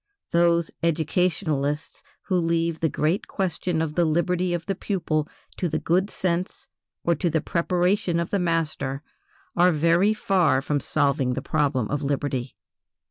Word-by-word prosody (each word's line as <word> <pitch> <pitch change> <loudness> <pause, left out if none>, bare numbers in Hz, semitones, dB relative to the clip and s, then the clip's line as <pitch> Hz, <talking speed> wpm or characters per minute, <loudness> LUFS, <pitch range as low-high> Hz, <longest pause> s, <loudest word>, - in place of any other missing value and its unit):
Those 170 -1 +3
educationalists 160 -2 0 0.2
who 190 - -1
leave 165 -1 0
the 160 - +1
great 160 +7 0
question 180 -3 -1
of 155 -2 -3
the 175 - +2
liberty 175 +3 +1
of 175 -1 -2
the 195 - -1
pupil 165 -6 -1 0.3
to 175 - -1
the 155 - -1
good 175 +6 +1
sense 180 -2 -2 0.4
or 170 - +3
to 170 +2 0
the 160 0 +1
preparation 180 +1 +1
of 170 - -3
the 200 - +1
master 155 -5 -1 0.5
are 180 +1 +5
very 170 +7 +3
far 185 -10 +2
from 145 +2 -1
solving 135 -2 +1
the 135 - -3
problem 140 -7 0
of 145 0 -1
liberty. 140 -3 -2
165 Hz, 150 wpm, -25 LUFS, 150-180 Hz, 0.5 s, are